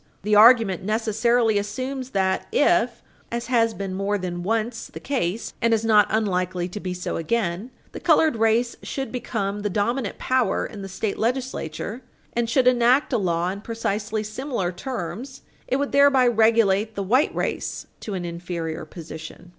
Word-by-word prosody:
The 210 +1 0
argument 220 -4 +6
necessarily 220 +1 +2
assumes 255 +6 -4
that 190 -4 0
if, 480 - +2 0.3
as 235 0 -3
has 230 -2 +2
been 195 -1 -4
more 195 +2 0
than 180 -2 -4
once 225 +4 -2
the - - -9
case 230 -7 -2
and 230 -1 +4
is 225 0 -2
not 215 -2 +5
unlikely 185 -4 0
to 210 - -6
be 185 -2 -4
so 180 - -3
again, 190 +3 -1 0.2
the - - -7
colored 310 -7 +3
race 225 +2 +2
should 270 -1 -4
become 205 -5 -3
the 205 0 -2
dominant 215 +4 -1
power 255 -2 +1
in 210 - -8
the 195 - -7
state 195 +2 -3
legislature, 240 - -3 0.3
and 235 -1 0
should 255 +1 +3
enact 250 +3 +4
a 240 - +3
law 175 -2 0
in 200 +2 -5
precisely 215 -1 -2
similar 215 -4 -3
terms, 245 +4 -6 0.2
it - - 0
would 280 +1 -1
thereby 280 -2 +5
relegate 220 -2 +3
the 200 - -2
white 255 +10 +2
race - - -3
to 205 - -5
an 180 -2 -4
inferior 170 -2 -5
position. 160 +1 -10
215 Hz, 165 wpm, -24 LUFS, 190-240 Hz, 0.3 s, argument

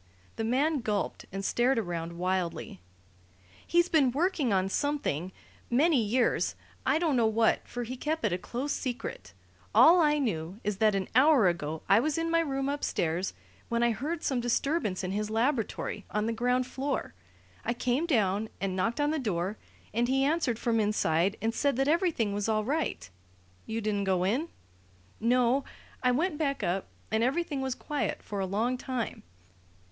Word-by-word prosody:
The 225 - -3
man 280 +7 +1
gulped 210 -4 -2
and 195 +1 -4
stared 245 +4 +2
around 170 -5 -3
wildly. 175 - -2 0.9
"He's 345 0 +3
been 300 -8 +3
working 300 - +1
on 190 -1 +2
something 195 - -1 0.4
many 280 +2 +4
years 235 +4 +1 0.3
I - - +4
don't 320 -4 +1
know 235 -2 +4
what, 225 +1 +2
for 245 - -4
he 245 +2 -5
kept 310 +5 -2
it - - +1
a 180 - -1
close 255 +9 -4
secret. 255 0 -5 0.4
All 345 +3 +8
I 300 -1 +3
knew 190 - -2
is 210 -1 -1
that 215 -1 +3
an 195 -1 -1
hour 260 -3 +6
ago 160 -2 -2
I 200 - +6
was 300 +5 0
in 330 0 -1
my 330 - +4
room 275 -4 -1
upstairs, 185 - -1 0.3
when 235 0 +1
I 235 - +4
heard 300 +9 -3
some 260 -3 0
disturbance 240 - 0
in 185 - -2
his 210 +2 -2
laboratory, 225 -3 -1
on 210 +1 -1
the 230 - 0
ground 250 +2 +1
floor. 270 - -3 0.5
I 235 - -1
came 255 +7 0
down 215 - +1
and 195 -1 -2
knocked 225 +8 0
on 290 +1 +2
the 315 - 0
door, 200 -4 -2 0.3
and 235 +2 +1
he 270 +1 +2
answered 285 -5 +1
from 230 -1 +1
inside 200 -3 +1
and 225 +1 +1
said 280 +2 +1
that 270 +2 +1
everything 310 - +1
was 205 +2 -1
all 215 -1 +1
right 295 - -1 0.3
" 90 0 -32
"You 225 +1 -2
didn't 205 -2 -1
go 185 -2 +1
in?" 255 - 0 0.7
"No. 245 +3 +3 0.4
I 250 - +3
went 300 +5 0
back 280 -3 -1
up, 185 +2 -1 0.2
and 220 +1 +2
everything 280 +2 0
was 265 -1 -2
quiet 295 -1 -3
for 205 - -5
a 190 - -1
long 230 +6 0
time. 255 -4 -3
235 Hz, 180 wpm, -29 LUFS, 200-280 Hz, 0.9 s, All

